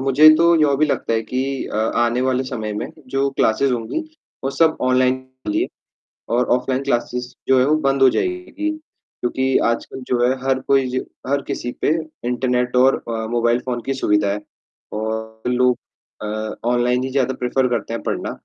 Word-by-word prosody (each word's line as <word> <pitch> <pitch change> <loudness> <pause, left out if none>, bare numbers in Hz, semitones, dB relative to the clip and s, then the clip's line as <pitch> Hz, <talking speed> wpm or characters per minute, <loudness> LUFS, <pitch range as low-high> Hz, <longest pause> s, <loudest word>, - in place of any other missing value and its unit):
मुझे 135 +3 +6
तो 170 0 +5
यह 140 -2 +4
भी 155 +2 +3
लगता 130 - -1
है 115 0 +1
कि 130 +3 -2 0.2
अ, - - -5
आने 120 +2 +1
वाले 130 0 +1
समय 110 -5 -4
में, 105 - -4 0.2
जो 135 +2 0
क्लासेस 130 +5 +2
होंगी 120 - -2 0.4
वो 135 - 0
सब 160 +3 +3
ऑनलाइन 130 -2 0 0.6
और 120 +2 +3
ऑफलाइन 130 +1 -2
क्लासेस 125 -1 -2
जो 130 -1 +5
है 125 - +4
वो 150 +2 +3
बंद 135 0 +1
हो 130 - +8
जाएगी। 360 - -2 0.5
क्योंकि 130 +2 +1
आजकल 115 +3 -2
जो 125 - +1
है - - +3
हर 135 -1 +1
कोई 135 -1 +4
ज 130 - 0 0.3
हर 140 +1 +1
किसी 120 - -3
पे - - +2 0.4
इंटरनेट 125 0 0
और 130 +2 +5
अ, 110 -1 -2
मोबाइल 120 0 +2
फ़ोन 120 -2 -2
की 135 - 0
सुविधा 105 -6 +1
है 105 - -3 0.5
और 110 +1 -4
लोग 125 0 +3 0.4
अ, 110 0 -4
ऑनलाइन 125 +1 +2
ही 130 - -2
ज़्यादा 130 -1 +1
प्रेफर 125 +1 +1
करते 115 -2 -2
हैं 115 - -3
पढ़ना, - - -2
125 Hz, 180 wpm, -20 LUFS, 120-135 Hz, 0.6 s, हो